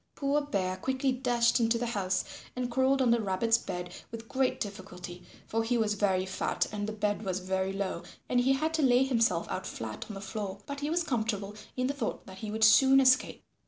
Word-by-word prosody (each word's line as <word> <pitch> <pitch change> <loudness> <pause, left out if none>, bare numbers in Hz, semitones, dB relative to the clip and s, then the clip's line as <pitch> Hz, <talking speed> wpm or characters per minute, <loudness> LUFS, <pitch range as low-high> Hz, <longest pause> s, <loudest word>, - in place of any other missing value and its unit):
Poor 285 +1 +1
Bear 185 -10 -2
quickly 265 +6 0
dashed 245 -2 +2
into 230 0 +2
the 240 - -2
house 190 -5 -1 0.3
and 250 -1 -2
crawled 265 +2 +3
under 235 -2 +3
Rabbit's 220 +4 +2
bed 180 0 -5 0.2
with 225 0 -8
great 265 0 0
difficulty 180 -3 -7 0.2
for 225 +1 -1
he 240 +2 +1
was 215 -2 +1
very 190 -2 +1
fat 190 - -1
and 205 0 -3
the - - -2
bed 210 -1 -1
was 185 -2 -1
very 190 +1 -1
low 195 0 -3 0.3
and 250 - +2
he 260 +2 +3
had 315 +4 -1
to 320 - +1
lay 255 -2 +5
himself 230 -10 +1
out 185 - -3
flat 110 -1 -6
on 210 - -6
the - - -6
floor, 200 -1 -5
but 280 0 -5
he 290 +1 -2
was 340 +2 +1
comfortable 220 -7 -2 0.2
in 255 - +1
the 275 - 0
thought 260 -6 -4
that 190 0 -11
he 215 - -5
would 220 +1 -1
soon 265 +5 +7
escape. 255 -1 +3
225 Hz, 215 wpm, -30 LUFS, 195-260 Hz, 0.3 s, soon